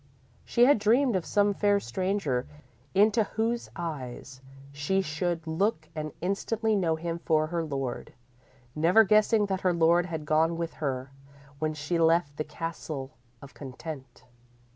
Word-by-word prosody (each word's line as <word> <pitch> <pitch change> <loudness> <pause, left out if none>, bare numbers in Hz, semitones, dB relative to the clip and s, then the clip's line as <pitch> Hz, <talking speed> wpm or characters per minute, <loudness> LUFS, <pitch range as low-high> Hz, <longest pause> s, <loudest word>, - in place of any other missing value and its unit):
She 240 - +4
had 275 -3 +5
dreamed 235 +3 +3
of 185 - -1
some 205 0 +2
fair 205 0 +2
stranger, 180 - -1 0.5
into 215 +3 +4
whose 230 +3 -2
eyes 135 -6 -6 0.3
she 145 +7 0
should 165 +1 -2
look 160 0 -1
and 155 -1 -4
instantly 215 +4 0
know 170 -5 +1
him 165 +1 -4
for 155 -2 +2
her 165 +1 -2
lord, 135 -5 -4 0.6
never 175 +8 +5
guessing 215 +1 +4
that 190 -1 -2
her 180 -1 +2
lord 170 +1 +3
had 160 -3 -5
gone 160 +2 +2
with 170 -1 -3
her 130 -2 -2 0.5
when 155 0 -1
she 150 +3 -2
left 165 -3 +2
the 155 - -1
Castle 150 -3 -6 0.3
of 140 - -12
Content. 135 -2 -9
165 Hz, 145 wpm, -28 LUFS, 150-200 Hz, 0.6 s, had